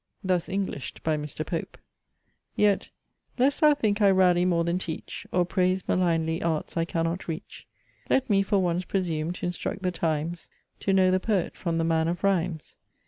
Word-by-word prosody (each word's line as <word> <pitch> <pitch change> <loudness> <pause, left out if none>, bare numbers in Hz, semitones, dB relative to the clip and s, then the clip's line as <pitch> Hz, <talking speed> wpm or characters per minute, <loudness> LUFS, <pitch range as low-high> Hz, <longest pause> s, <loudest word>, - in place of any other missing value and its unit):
Thus 185 -2 0
Englished 190 -8 -4
by 160 -1 +1
Mr. 150 +1 -4
Pope: 165 - -4 0.8
Yet, 205 -2 +2 0.5
lest 270 +3 +2
thou 300 -1 +6
think 215 -6 0
I 200 - +6
rally 180 -2 +4
more 170 -2 +2
than 170 +2 0
teach, 165 -3 -6
Or 180 -1 +2
praise 185 +1 0
malignly 165 -2 +1
arts 160 -2 -2
I 165 -1 +1
cannot 165 +1 -2
reach; 165 +3 -7 0.4
Let 265 - +2
me, 200 -3 +3
for 200 +1 +1
once, 180 -1 +1
presume 170 -4 -1
t'instruct 180 +2 -4
the 180 - +1
times 165 0 -2 0.3
To 195 - 0
know 190 -1 +4
the 185 - +3
poet 195 -3 -1
from 170 -2 -2
the 165 - +1
man 165 -1 +2
of 175 +2 -3
rhymes. 180 -5 -1
180 Hz, 175 wpm, -27 LUFS, 165-190 Hz, 0.8 s, thou